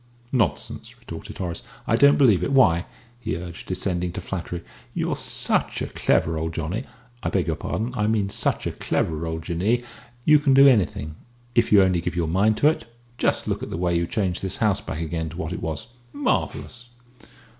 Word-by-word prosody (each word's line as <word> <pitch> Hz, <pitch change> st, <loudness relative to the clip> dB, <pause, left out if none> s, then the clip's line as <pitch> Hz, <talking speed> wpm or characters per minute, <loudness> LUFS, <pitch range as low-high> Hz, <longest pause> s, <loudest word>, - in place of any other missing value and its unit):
"Nonsense!" 115 Hz, -, -1 dB
retorted -, -, -9 dB
Horace; 90 Hz, -3 st, -4 dB, 0.2 s
"I 115 Hz, -, +2 dB
don't 140 Hz, +4 st, +6 dB
believe 110 Hz, -, +5 dB
it. -, -, -1 dB
Why," 90 Hz, -11 st, +4 dB, 0.3 s
he 120 Hz, -, -3 dB
urged, 85 Hz, -1 st, -8 dB
descending 90 Hz, -1 st, -1 dB
to -, -, -4 dB
flattery, 90 Hz, -2 st, -5 dB, 0.3 s
"you're -, -, 0 dB
such -, -, 0 dB
a -, -, -4 dB
clever 80 Hz, -1 st, +1 dB
old 80 Hz, +1 st, -3 dB
Johnny 90 Hz, +10 st, -3 dB, 0.4 s
I -, -, -1 dB
beg 95 Hz, -3 st, +1 dB
your 80 Hz, -, -1 dB
pardon, 110 Hz, +10 st, -3 dB
I 105 Hz, -3 st, +1 dB
meant 105 Hz, -3 st, +1 dB
such -, -, 0 dB
a -, -, -1 dB
clever 80 Hz, 0 st, -1 dB
old 80 Hz, 0 st, -4 dB
Jinnee 95 Hz, +9 st, 0 dB, 0.4 s
you 150 Hz, -1 st, +7 dB
can 140 Hz, -2 st, +3 dB
do 135 Hz, +1 st, +9 dB
anything, 90 Hz, -, +2 dB, 0.4 s
if 120 Hz, -1 st, +2 dB
you 100 Hz, -2 st, +8 dB
only 90 Hz, -2 st, +2 dB
give 85 Hz, -, -3 dB
your 85 Hz, -2 st, 0 dB
mind 100 Hz, +6 st, +2 dB
to 145 Hz, -, +4 dB
it. 155 Hz, -, +1 dB, 0.3 s
Just -, -, +1 dB
look -, -, -1 dB
at -, -, -5 dB
the -, -, -4 dB
way 90 Hz, 0 st, +1 dB
you 85 Hz, 0 st, +1 dB
changed 95 Hz, -3 st, -1 dB
this 95 Hz, 0 st, -2 dB
house 105 Hz, -3 st, +2 dB
back 85 Hz, -6 st, -5 dB
again 80 Hz, 0 st, -3 dB
to 80 Hz, -, -10 dB
what 85 Hz, -1 st, -3 dB
it -, -, -5 dB
was. 80 Hz, +8 st, -4 dB, 0.2 s
Marvellous!" 120 Hz, -, -2 dB
90 Hz, 200 wpm, -24 LUFS, 85-110 Hz, 0.4 s, do